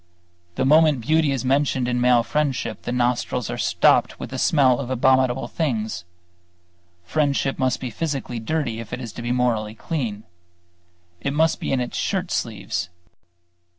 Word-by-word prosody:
The - - 0
moment 150 -2 +5
beauty 155 +5 +2
is 130 -2 -2
mentioned 135 -1 +1
in 125 0 0
male 125 -1 +4
friendship, 135 -6 -1
the - - -4
nostrils 125 -1 0
are - - -4
stopped - - +3
with - - -7
the - - -4
smell 130 -5 +4
of 130 -3 -4
abominable 130 -1 +2
things. 110 - -2 1.0
Friendship 140 - 0
must 130 -1 +1
be 125 -2 -5
physically 135 -2 -3
dirty 115 -2 -2
if 115 -2 -8
it - - -3
is 115 -4 -7
to - - -7
be 120 +1 -2
morally 115 -4 0
clean. 115 -9 -4 1.0
It 140 - -2
must 160 +2 +2
be - - -3
in 135 - +1
its 125 - -3
shirt 190 -3 -1
sleeves. 100 -5 -2
125 Hz, 160 wpm, -23 LUFS, 115-140 Hz, 1.0 s, moment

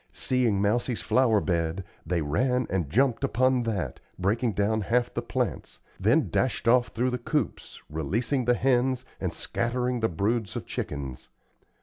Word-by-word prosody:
Seeing 125 -6 +1
Mousie's 115 +4 0
flower 120 -5 +3
bed, 85 0 -1 0.2
they 85 -1 0
ran 125 - +1
and 90 -6 -1
jumped 125 - +2
upon 130 0 +2
that, 100 - -3 0.2
breaking 110 +5 +1
down 105 +3 +1
half 120 +4 +1
the - - -2
plants, - - -3 0.2
then - - +2
dashed - - 0
off 120 +1 +5
through 125 +3 -1
the 125 - -2
coops, 145 +1 -3
releasing 110 - -1
the 120 +1 +4
hens, 130 0 +1
and - - -2
scattering 125 +1 -1
the 110 - +1
broods 100 +5 -1
of - - -4
chickens. 70 -3 -5
115 Hz, 150 wpm, -27 LUFS, 95-125 Hz, 0.2 s, off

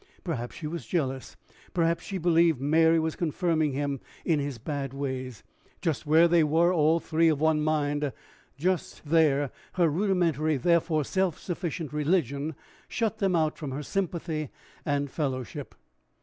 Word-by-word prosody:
Perhaps 125 -9 -4
she 155 - -7
was 165 +2 -5
jealous; 135 -6 -2 0.4
perhaps 170 -1 +1
she 195 - -4
believed 165 -4 +3
Mary 160 +4 +4
was 160 0 -1
confirming 160 -3 0
him 140 0 -2 0.3
in 160 -3 +2
his 140 -3 -3
bad 135 +2 -4
ways. 130 -4 -4 0.4
Just 160 -2 -2
where 160 +3 +6
they 170 -1 +4
were 165 +4 +3
all 160 0 +3
three 165 0 +2
of 150 -3 +1
one 155 0 +3
mind 145 -2 0 0.5
just 180 +1 -2
there 145 -3 +3 0.2
her 175 -3 +3
rudimentary 165 -4 +1
therefore 165 +1 +2
self 190 +2 0
sufficient 165 -4 -4
religion 150 -1 0 0.3
shut 225 -2 -1
them 195 -3 +2
out 155 -2 +1
from 150 -4 -4
her 135 +3 -4
sympathy 165 -5 -2 0.4
and 145 -1 0
fellowship. 130 -5 -4
155 Hz, 150 wpm, -28 LUFS, 145-170 Hz, 0.5 s, where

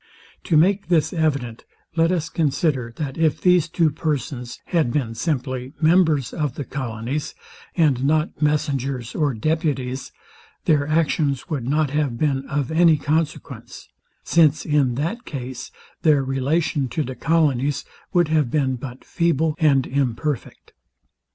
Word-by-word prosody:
To 160 - +3
make 195 +5 +3
this 170 -1 +2
evident, 140 -8 -1 0.3
let 165 +1 +3
us 165 -3 0
consider, 140 -5 0
that 145 -1 -5
if 160 -2 +2
these 180 -3 +3
two 165 -2 +2
persons 140 -5 -3
had 160 -9 +1
been 125 -5 -1
simply 130 -1 -3
members 160 -5 +3
of 150 -5 -2
the 145 - -4
colonies, 130 +2 -4 0.4
and 145 -7 +3
not 155 +2 0
messengers 140 -5 -1
or 145 -5 0
deputies, 135 -1 -1 0.5
their 145 -2 +2
actions 155 -3 0
would 130 -6 -2
not 150 0 +1
have 145 -5 0
been 135 -1 0
of 140 0 -1
any 165 -1 +5
consequence; 155 +2 -3 0.3
since 155 -3 +3
in 140 -5 +2
that 170 - -2
case 130 -3 -6 0.3
their 150 -4 +4
relation 135 +2 0
to 150 +6 -1
the 130 - -5
colonies 145 -2 +1 0.3
would 175 -3 +2
have 155 -5 +2
been 130 -2 0
but 125 0 -9
feeble 160 -2 +1
and 140 -5 +3
imperfect. 135 0 -3
145 Hz, 140 wpm, -22 LUFS, 130-160 Hz, 0.5 s, any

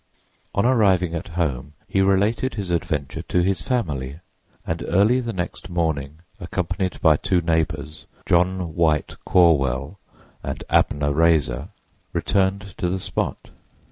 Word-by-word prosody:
On 100 - +2
arriving 95 -9 +3
at 85 - -4
home 75 -4 -1
he 95 - +1
related 100 +7 +2
his 100 -4 -3
adventure 80 -2 -2
to 90 +1 0
his 95 -2 0
family, 75 - -2 0.5
and 80 0 -3
early 105 +8 +4
the 120 -2 -3
next 95 -1 -5
morning, 80 -3 -2 0.2
accompanied 90 +1 -2
by 80 -2 +5
two 90 +3 +1
neighbors, 80 -2 -2 0.2
John 90 -1 +1
White 80 -3 +1
Corwell 75 -1 +3 0.4
and - - -5
Abner 70 0 +2
Raiser, 80 -6 +2 0.4
returned 100 0 0
to 90 - 0
the 95 - -1
spot. - - -4
85 Hz, 130 wpm, -23 LUFS, 75-95 Hz, 0.5 s, by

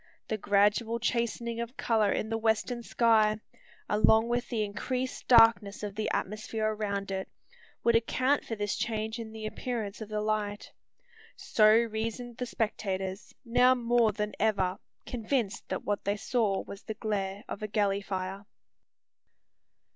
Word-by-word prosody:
The 220 - 0
gradual 205 +3 +2
chastening 235 0 -1
of 235 +3 -6
colour 220 -3 +2
in - - -1
the 225 - 0
western 225 +2 0
sky, 220 -2 +3 0.5
along 220 +2 +4
with 240 0 -1
the 225 -3 0
increased 250 +5 -3
darkness 225 -4 +5
of 205 -1 -4
the 215 +1 -2
atmosphere 215 +2 -2
around 200 -2 -3
it, 190 0 -3 0.5
would 235 0 +4
account 255 +5 +2
for 225 - -4
this 205 -1 -2
change 220 0 -2
in 225 -1 -6
the 220 -1 -7
appearance 215 -2 -4
of 215 - -6
the 215 0 -2
light. 210 -1 -2 0.6
So 215 -1 +4
reasoned 230 +1 0
the 250 - -3
spectators, 195 -4 -3
now 250 +2 +5
more 240 -2 +3
than 210 0 -3
ever 195 -4 +1 0.3
convinced 235 -3 -2
that - - -3
what 205 -1 -1
they 200 +1 0
saw 210 -3 0
was 200 - -9
the 220 - -6
glare 205 -2 -3
of - - -6
a 215 - -2
galley 200 -1 +1
fire. 195 +1 -4
215 Hz, 150 wpm, -29 LUFS, 205-235 Hz, 0.6 s, darkness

